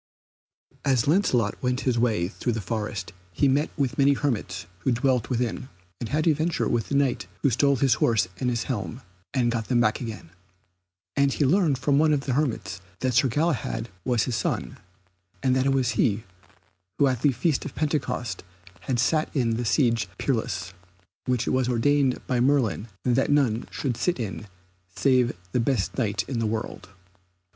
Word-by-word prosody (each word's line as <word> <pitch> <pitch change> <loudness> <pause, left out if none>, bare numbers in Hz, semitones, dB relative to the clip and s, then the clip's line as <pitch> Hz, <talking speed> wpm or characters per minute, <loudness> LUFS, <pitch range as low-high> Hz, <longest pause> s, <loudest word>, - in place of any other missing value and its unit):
As 130 -4 +2
Lancelot 130 - +2
went 125 0 0
his 125 -3 +1
way 110 -8 +1
through 120 +4 -3
the 110 - -2
forest 105 -1 -4 0.2
he 140 - +2
met 140 +3 +2
with 135 -4 -1
many 140 +1 +5
hermits 105 -10 -2
who 130 - 0
dwelled 125 -1 +1
therein, 125 +1 -2 0.3
and 115 - -4
had 155 +2 0
adventure 160 +1 +1
with 120 -2 -1
the 140 - -1
Knight 140 -2 +1 0.2
who 140 - +4
stole 140 +4 +3
his 130 -1 +3
horse 110 -5 +3
and 125 - 0
his 120 -1 -1
helm, 115 0 -4 0.3
and 120 -3 +1
got 115 -2 -2
them 125 -2 +2
back 110 0 +2
again. 110 -8 -7 0.8
And 140 0 +3
he 145 - +1
learned 155 -2 +3
from 140 +3 +2
one 155 0 +4
of 145 - +1
the 135 -2 -2
hermits 130 - -1 0.2
that 130 -1 +1
Sir 135 +3 +4
Galahad 130 -4 -1
was 120 -4 +1
his 125 - -2
son, - - -2 0.6
and 130 -1 +3
that 130 +1 +2
it - - +3
was 130 -3 +2
he 110 -1 +1 0.7
who 145 - +4
at 130 -4 0
the 145 - +4
Feast 135 +4 0
of - - -7
Pentecost 150 -6 -2 0.4
had 130 - -2
sat 155 +6 +2
in 120 -4 +2
the 120 - -2
Siege 115 - +2
Perilous, 95 -8 -2 0.5
which 125 -1 +1
it - - 0
was 130 -1 +1
ordained 130 +2 +2
by 125 -2 0
Merlin 125 -4 +2 0.2
that 125 +1 +2
none 130 -6 +2
should 130 -4 -2
sit 175 +5 0
in 105 -2 -5 0.5
save 125 -3 +3 0.2
the 125 - +1
best 115 -4 0
Knight 105 -5 0
in 130 -4 -2
the 115 - 0
world. 110 -2 -4
125 Hz, 180 wpm, -25 LUFS, 115-140 Hz, 0.8 s, many